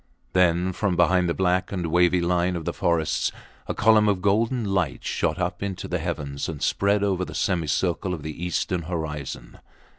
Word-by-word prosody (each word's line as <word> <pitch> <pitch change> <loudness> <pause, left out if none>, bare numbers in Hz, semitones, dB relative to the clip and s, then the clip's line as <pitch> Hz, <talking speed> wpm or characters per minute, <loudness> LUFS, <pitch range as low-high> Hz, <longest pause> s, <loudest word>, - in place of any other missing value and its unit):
Then 90 0 +3
from 100 -1 0
behind 90 0 +3
the - - 0
black 95 0 +1
and 90 -3 -2
wavy 90 +1 +4
line 90 +1 +1
of 85 -2 -5
the - - -2
forests 85 -3 0 0.4
a - - -3
column 105 0 +5
of 100 -2 +1
golden 110 +5 +1
light 95 -7 -1
shot - - 0
up 90 -1 -2
into 100 -2 -4
the 90 - -2
heavens 75 -4 -4
and 80 -3 -5
spread 100 +5 +1
over 95 -2 +1
the - - -7
semicircle 90 +1 0
of 85 -5 -4
the 80 +2 -6
eastern 90 0 -1
horizon. 80 -5 -5
90 Hz, 180 wpm, -24 LUFS, 85-95 Hz, 0.4 s, column